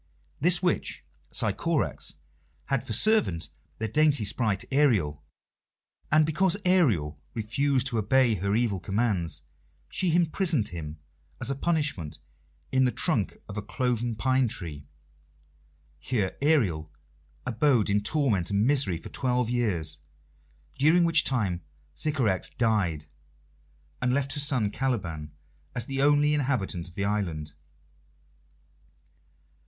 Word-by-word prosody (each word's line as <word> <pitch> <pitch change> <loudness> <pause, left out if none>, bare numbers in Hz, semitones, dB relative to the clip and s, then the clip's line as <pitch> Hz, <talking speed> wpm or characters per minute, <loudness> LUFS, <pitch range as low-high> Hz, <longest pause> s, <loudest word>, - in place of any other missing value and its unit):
This 175 +4 +3
witch 180 - -1 0.3
Sycorax - - -1 0.5
had 135 -3 0
for - - -7
servant 120 - +3 0.3
the 110 - -2
dainty 145 -1 +3
sprite 105 -2 0
Ariel, 100 - +2 0.9
and 155 +1 +5
because 175 +4 +2
Ariel 100 - +2
refused 130 +4 +1
to 120 -4 0
obey 120 +3 +3
her 100 +1 -1
evil 110 -5 +1
commands 95 -4 -1 0.5
she 175 -3 0
imprisoned 165 - +1
him 80 -3 -7 0.4
as - - 0
a - - -1
punishment 145 - -1 0.5
in 130 0 +3
the 125 - +2
trunk - - 0
of 105 - -7
a - - -1
cloven 120 +1 -1
pine 130 +3 +2
tree. 75 -9 -5 1.1
Here 105 -7 -1
Ariel 105 - +2 0.6
abode 125 -2 +2
in 105 0 +2
torment 110 - +1
and 100 +1 +2
misery 130 - +3
for 80 - -10
twelve 125 -2 0
years, 85 -11 -1 0.8
during 160 +5 +5
which 165 -1 +5
time 100 -10 0 0.3
Sycorax 125 - 0
died, 100 -10 0 1.0
and 125 0 +1
left 140 -1 -1
her 150 - -3
son 130 -8 +1
Caliban 90 - -3 0.4
as 120 - -1
the 135 +1 -2
only 145 +1 +4
inhabitant 125 - -1
of 85 - -19
the 100 - -1
island. 85 -8 -2
120 Hz, 120 wpm, -27 LUFS, 95-140 Hz, 1.1 s, and